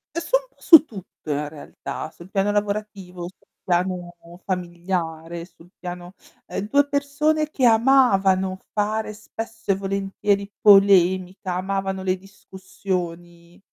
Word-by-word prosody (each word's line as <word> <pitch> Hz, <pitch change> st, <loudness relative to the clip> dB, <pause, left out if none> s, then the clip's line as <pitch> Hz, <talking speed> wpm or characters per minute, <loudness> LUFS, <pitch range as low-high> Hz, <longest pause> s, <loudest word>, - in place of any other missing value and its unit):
È -, -, 0 dB
u -, -, -6 dB, 0.2 s
un -, -, -18 dB
pò -, -, -39 dB
su 320 Hz, -2 st, +8 dB
tutto 190 Hz, -, -12 dB
in 150 Hz, 0 st, -1 dB
realtà, 155 Hz, 0 st, -7 dB
sul 170 Hz, +3 st, -15 dB
piano 195 Hz, 0 st, +1 dB
lavorativo, 205 Hz, -3 st, -3 dB
sul 180 Hz, +2 st, -11 dB, 0.2 s
piano 180 Hz, 0 st, -1 dB, 0.3 s
familiare 170 Hz, -2 st, -3 dB
sul 175 Hz, -1 st, -17 dB
piano, 180 Hz, 0 st, -8 dB, 0.3 s
ehm, 205 Hz, -, -5 dB
2 285 Hz, +2 st, +4 dB
persone 295 Hz, +2 st, 0 dB
che 265 Hz, -4 st, 0 dB
amavano 200 Hz, -6 st, +4 dB
fare 215 Hz, +1 st, -1 dB
spesso 225 Hz, 0 st, -5 dB
e -, -, +3 dB
volentieri 195 Hz, +1 st, -1 dB
polemica, 190 Hz, -2 st, +4 dB
amavano 190 Hz, +1 st, -2 dB
le 185 Hz, 0 st, 0 dB
discussioni. 180 Hz, -2 st, -7 dB
190 Hz, 125 wpm, -23 LUFS, 180-210 Hz, 0.3 s, su